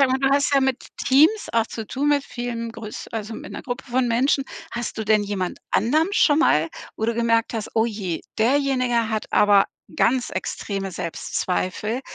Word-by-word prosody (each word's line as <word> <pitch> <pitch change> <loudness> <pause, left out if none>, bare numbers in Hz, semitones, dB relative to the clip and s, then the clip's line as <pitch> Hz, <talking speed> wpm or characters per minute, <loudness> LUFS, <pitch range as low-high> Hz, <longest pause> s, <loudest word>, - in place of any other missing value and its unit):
Sag 275 - +5
mal, 260 +1 +1
du 270 0 +2
hast 285 +1 +2
ja 275 - +5
mit 265 -1 -1
Teams 315 +11 +4
auch 230 -1 +2
zu 225 -2 -6
tun, 280 +6 -1
mit 290 -1 +2
vielen 235 -1 -5
größ 225 -2 -8
also, 225 0 -4
mit 295 - -8
'ner - - -6
Gruppe 245 -2 -5
von 250 0 +2
Menschen. 265 +4 +2 0.3
Hast 235 -2 -4
du 220 - -2
denn 215 0 +3
jemand 200 -3 -3
anderem 305 - +2
schon 295 -8 +4
mal, 160 - +3 0.3
wo 220 - -2
du 230 +1 0
gemerkt 230 0 +1
hast: 220 -1 -4
„Oh 225 0 +3
je, 200 -7 -3 0.2
derjenige 255 -1 +2
hat 220 -1 -2
aber 205 -1 +5 0.3
ganz 245 +1 +2
extreme 195 +1 -4
Selbstzweifel, 185 +6 -2
235 Hz, 190 wpm, -23 LUFS, 215-265 Hz, 0.3 s, Sag